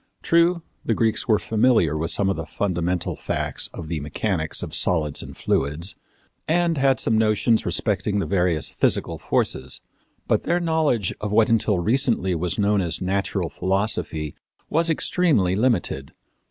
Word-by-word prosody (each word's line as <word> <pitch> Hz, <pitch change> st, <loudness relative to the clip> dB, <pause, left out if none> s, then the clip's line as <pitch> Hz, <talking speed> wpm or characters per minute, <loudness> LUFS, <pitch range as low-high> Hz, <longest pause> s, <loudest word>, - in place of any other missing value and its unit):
True, 170 Hz, 0 st, +3 dB, 0.2 s
the 115 Hz, -, 0 dB
Greeks 110 Hz, -1 st, +1 dB
were 110 Hz, -3 st, +4 dB
familiar 110 Hz, -, +2 dB
with 80 Hz, +2 st, -2 dB
some 100 Hz, -, +1 dB
of 95 Hz, -, +1 dB
the 80 Hz, 0 st, -6 dB
fundamental 90 Hz, -1 st, -2 dB
facts -, -, -1 dB
of 80 Hz, -, -8 dB
the 80 Hz, -1 st, -3 dB
mechanics 80 Hz, +2 st, -2 dB
of -, -, -7 dB
solids 75 Hz, -5 st, 0 dB
and -, -, -10 dB
fluids, 75 Hz, +7 st, 0 dB, 0.5 s
and 170 Hz, +1 st, +2 dB
had 135 Hz, -1 st, +3 dB
some 110 Hz, -1 st, +2 dB
notions 110 Hz, +1 st, +2 dB
respecting 100 Hz, -1 st, 0 dB
the 100 Hz, -, 0 dB
various 90 Hz, -6 st, 0 dB
physical -, -, 0 dB
forces; 65 Hz, 0 st, -1 dB, 0.5 s
but -, -, +2 dB
their 175 Hz, +1 st, 0 dB
knowledge 160 Hz, -, +1 dB
of 105 Hz, -1 st, -3 dB
what 110 Hz, +1 st, +4 dB
until 110 Hz, -3 st, +2 dB
recently 110 Hz, -1 st, +1 dB
was 85 Hz, 0 st, -2 dB
known 105 Hz, -1 st, +2 dB
as 85 Hz, -3 st, -1 dB
natural 95 Hz, +2 st, -1 dB
philosophy 95 Hz, -6 st, -2 dB, 0.4 s
was 165 Hz, +2 st, +2 dB
extremely 150 Hz, -, +2 dB
limited. 105 Hz, -, 0 dB
100 Hz, 155 wpm, -23 LUFS, 85-120 Hz, 0.5 s, were